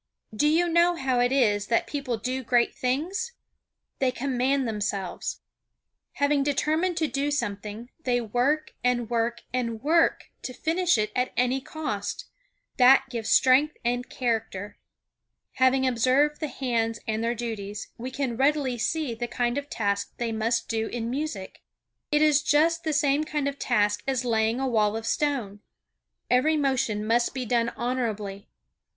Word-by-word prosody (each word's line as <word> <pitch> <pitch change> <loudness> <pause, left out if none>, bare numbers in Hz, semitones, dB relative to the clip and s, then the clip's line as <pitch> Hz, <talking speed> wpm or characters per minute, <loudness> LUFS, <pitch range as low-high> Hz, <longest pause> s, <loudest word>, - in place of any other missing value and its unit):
Do 295 +8 +2
you 330 +3 +3
know 340 +1 +3
how 265 -5 0
it 245 +1 +2
is 210 -7 +2
that 230 - +2
people 275 -5 -3
do 255 +4 -3
great 240 0 +2
things? 355 - -2 0.7
They 265 - +2
command 260 +1 0
themselves. 205 -3 -3 0.7
Having 285 0 +2
determined 310 +5 0
to 320 -2 +1
do 275 +2 -1
something, 215 -3 -4
they 245 -3 +1
work 245 +7 0
and 240 -2 0
work 235 0 -1
and 235 -3 -2
work 330 +3 +2
to 255 - -6
finish 340 0 +1
it 215 0 0
at 250 0 0
any 250 +2 +1
cost. 260 - -4 0.5
That 265 +1 +6
gives 230 -3 -3
strength 270 +4 +4
and 245 +1 -1
character. 225 -5 -3 0.8
Having 260 0 +4
observed 260 +4 +2
the 310 - -2
hands 230 -5 -1
and 220 0 -1
their 235 +1 0
duties, 210 -3 -5
we 250 +2 -4
can 260 -2 -2
readily 270 -2 +1
see 300 +1 -1
the 240 +1 -4
kind 240 0 -1
of 285 0 -4
task 200 -2 -2
they 235 -1 -2
must 225 +2 0
do 225 -1 -1
in 235 -1 -4
music. 260 -9 -4 0.5
It 300 0 +4
is 300 -1 +4
just 330 +4 +2
the 315 - 0
same 290 0 +2
kind 300 -2 -2
of 280 0 -4
task 210 -4 +1
as 260 -2 0
laying 225 0 +1
a 270 - 0
wall 215 -3 +2
of 225 - -6
stone. 240 -7 -1 0.7
Every 295 +6 +3
motion 250 -7 0
must 235 +3 +1
be 255 -1 -3
done 235 0 +1
honorably. 215 -5 -3
250 Hz, 155 wpm, -26 LUFS, 225-285 Hz, 0.8 s, That